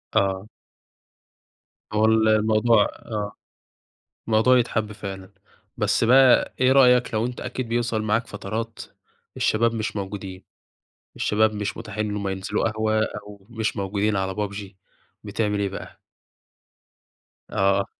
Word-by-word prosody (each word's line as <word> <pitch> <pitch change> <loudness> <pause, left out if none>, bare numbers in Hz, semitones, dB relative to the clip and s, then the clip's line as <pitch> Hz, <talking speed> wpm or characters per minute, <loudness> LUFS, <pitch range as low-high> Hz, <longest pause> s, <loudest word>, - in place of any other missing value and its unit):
آه. 95 +1 +1 1.5
هو 110 +1 +3
ال 110 0 +4
الموضوع 110 +1 +4
آه، 105 -2 -5 1.0
الموضوع 115 +4 +4
يتحب 110 -3 -1
فعلًا. 95 -2 -8 0.4
بس - - +1
بقى 130 +1 +5
إيه 130 +1 +5
رأيك 125 -3 +5
لو 110 +2 +1
أنت 125 - -6
أكيد 130 -1 -4
بيوصل 115 -2 0
معاك 110 +2 0
فترات 110 +3 -5 0.6
الشباب 115 +1 +2
مش 110 -1 -3
موجودين، 95 -1 -6 0.7
الشباب 110 +1 +2
مش 105 -1 -3
متاحين 110 -1 -4
إن 105 - -3
هم 100 -1 -2
ينزلوا 95 +3 -1
قهوة 110 0 0
أو 105 -1 -9
مش 110 -1 -2
موجودين 100 +1 0
على 95 0 -1
PUBG، 105 0 -4 0.6
بتعمل 105 0 -1
إيه 100 - 0
بقى؟ 100 - -9 1.5
آه. 100 0 +2
110 Hz, 125 wpm, -24 LUFS, 100-115 Hz, 1.5 s, بقى